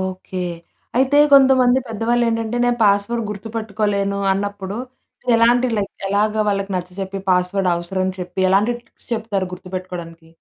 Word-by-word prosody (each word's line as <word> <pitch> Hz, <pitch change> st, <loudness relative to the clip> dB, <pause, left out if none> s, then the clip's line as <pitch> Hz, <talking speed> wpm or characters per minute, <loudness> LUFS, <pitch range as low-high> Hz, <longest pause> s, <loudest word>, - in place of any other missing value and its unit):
Okay. 185 Hz, 0 st, -4 dB, 0.5 s
అయితే 270 Hz, +3 st, +3 dB
కొంతమంది 260 Hz, -2 st, +6 dB
పెద్దవాళ్ళు 230 Hz, +2 st, 0 dB
ఏంటంటే, 225 Hz, +1 st, -1 dB
"నేను 240 Hz, -1 st, +1 dB
పాస్‌వర్డ్ 205 Hz, +3 st, +2 dB
గుర్తుపెట్టుకోలేను" 205 Hz, -1 st, -2 dB
అన్నప్పుడు, 200 Hz, 0 st, -3 dB, 0.6 s
ఎలాంటి 240 Hz, +2 st, +4 dB
లైక్ 200 Hz, -1 st, -2 dB, 0.2 s
ఎలాగ 210 Hz, +2 st, +1 dB
వాళ్ళకి 195 Hz, 0 st, -1 dB
నచ్చచెప్పి, 190 Hz, +2 st, -5 dB
పాస్‌వర్డ్ 180 Hz, +1 st, +2 dB
అవసరం 175 Hz, +2 st, -3 dB
అని 185 Hz, -, -3 dB
చెప్పి, 180 Hz, +1 st, -5 dB
ఎలాంటి 210 Hz, +5 st, +3 dB
టిప్స్ 240 Hz, -, -26 dB
చెప్తారు 205 Hz, -5 st, -2 dB
గుర్తుపెట్టుకోవడానికి. 180 Hz, -3 st, -8 dB
200 Hz, 125 wpm, -20 LUFS, 185-230 Hz, 0.6 s, కొంతమంది